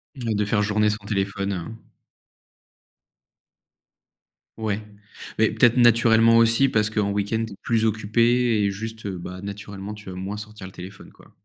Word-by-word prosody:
De 110 -5 -1
faire 105 0 +1
journée 105 0 +2
sans 105 -1 -4
téléphone, 100 -1 -2
heu? 105 +6 -8 2.7
Ouais, 110 -1 -2 0.6
mais 110 0 +3
peut-être 120 +1 +3
naturellement 115 -1 +5
aussi 115 +4 +4
parce 105 -2 +1
qu'en 105 -2 0
week-end 105 +3 -1
tu 110 - -10
es - - -11
plus 115 -1 +1
occupée 115 +2 +2
et 100 - +1
juste, 110 +1 -6
bah, 90 -1 -6
naturellement 100 0 -7
tu 105 -2 -11
vas 90 - -7
moins 95 +3 -5
sortir 105 -1 -9
le 95 - -13
téléphone, 95 +2 -11
quoi. - - -21
105 Hz, 150 wpm, -23 LUFS, 100-115 Hz, 2.7 s, naturellement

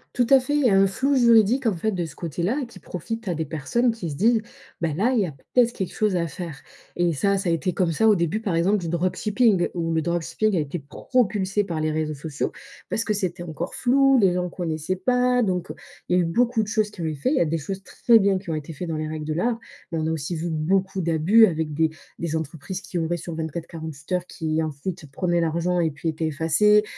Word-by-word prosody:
Tout 245 - +3
à 270 - +9
fait, 290 +3 -2
il 295 -2 +2
y - - +6
a - - +4
un 195 0 +5
flou 270 +8 0
juridique, 235 0 +5
en 210 - +2
fait, 220 +6 0
de 180 -3 -2
ce 155 - -10
côté-là, 175 - -2
qui 215 -5 -14
profite 225 +7 -6
à 175 - 0
des 160 - -2
personnes 160 - 0
qui 225 -7 -5
se 145 - -5
disent: 225 +7 +3 0.4
«Bah, 165 - +1
là, 235 +6 +2
il 245 - +2
y - - +2
a - - -6
peut-être 235 - +1
quelque 190 -6 -4
chose 210 -3 +1
à 170 -1 +1
faire» 160 -5 -7 0.3
et 175 -1 +1
ça, 200 +7 +1
ça 190 -2 -1
a - - +3
été 170 +2 0
comme 180 -3 +1
ça 220 +8 +2
au 210 - +6
début, 170 +4 0
par 195 -7 -1
exemple, 185 +5 +3
du 175 - -5
dropshipping 190 +4 +2
où 165 -1 -1
le 160 - +1
dropshipping 175 +5 0
a - - +2
été 150 +3 -3
propulsé 200 - 0
par 170 -5 -4
les 155 0 0
réseaux 155 -1 -2
sociaux 150 0 -3 0.4
parce 225 - 0
que 215 - 0
c'était 185 -3 -2
encore 170 0 -5
flou. 270 +2 +4
Les 190 -4 +4
gens 180 0 -1
connaissaient 165 0 -3
pas 250 +4 +2
donc 180 -3 -1
heu, - - -6 0.3
il 180 - +3
y - - +4
a 175 - +3
eu - - 0
beaucoup 230 +6 +2
de - - -6
choses 215 -1 +1
qui 195 - -10
ont - - -2
été 160 - -1
fait. 140 - -1
Il 290 - +2
y - - +2
a - - +4
des 165 +1 -1
choses 190 +6 -5
très 230 +3 +4
bien 195 -2 +2
qui 185 -2 -11
ont 160 - 0
été 155 +1 -6
faits 175 +4 -6
dans 160 - -2
les 155 - -3
règles 155 -1 -5
de 155 - -2
l'art 230 +8 0 0.3
mais 165 - -1
on 155 - -1
a 160 - 0
aussi 160 +2 -3
vu 165 +2 -3
beaucoup 190 +5 0
d'abus 170 +7 +5
avec 160 -5 -2
des 160 +1 +2 0.3
des 165 -1 -3
entreprises 160 +4 -5
qui 180 -2 -6
ouvraient 170 +1 0
sur 170 -1 -6
24-48 160 -1 -6
heures, 180 -1 0
qui, 160 -2 -2
ensuite, 155 +3 -5
prenaient 175 +2 0
l'argent 170 +2 0
et 165 -2 +1
puis 150 +3 -3
étaient 160 0 -2
effacées, 165 +8 +3
175 Hz, 260 wpm, -24 LUFS, 160-210 Hz, 0.4 s, à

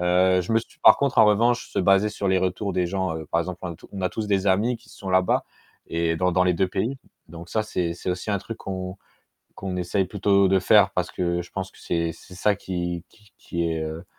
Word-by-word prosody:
heu, 90 +1 +3
je 100 - -3
me 115 - +5
suis 115 - -11
par 110 - +9
contre, 140 -3 0
en 110 - +9
revanche 120 +4 +2
se - - -3
baser 95 +3 +4
sur 105 -1 -4
les 95 0 +3
retours 95 +2 -1
des 90 -1 +1
gens, 95 -2 -2
heu, 80 -2 -7
par 85 - +2
exemple, 90 +1 -5
un 85 - -5
tout - - -16
on 100 - -6
a 90 - +1
tous 110 +4 -4
des 100 -1 +1
amis 110 +6 +2
qui - - -22
sont 95 -1 -8
là-bas 95 0 +2 0.4
et 85 0 0
dans 90 +2 +1
dans 90 +1 +3
les 90 -1 +2
2 95 +2 +1
pays, 110 +9 -2 0.3
donc 85 +1 -10
ça 110 - +1
c'est 90 -5 -2
c'est 90 - -7
aussi 90 +4 -3
un 100 - +1
truc 115 +3 -7
qu'on 95 -1 -5 0.6
qu'on 95 -1 -5
essaie 90 +2 0
plutôt 100 0 +3
de 95 0 +4
faire, 100 +1 +5
parce 90 - -1
que 85 -1 -1
je 85 - -15
pense 95 0 -4
que - - -21
c'est 85 -1 -1
c'est 90 +3 -15
ça 100 +3 +1
qui 85 -3 -4
qui 105 -1 -23
qui 85 -1 -2
est, 80 -1 -2
heu, 80 +3 -6
95 Hz, 255 wpm, -24 LUFS, 85-100 Hz, 0.6 s, par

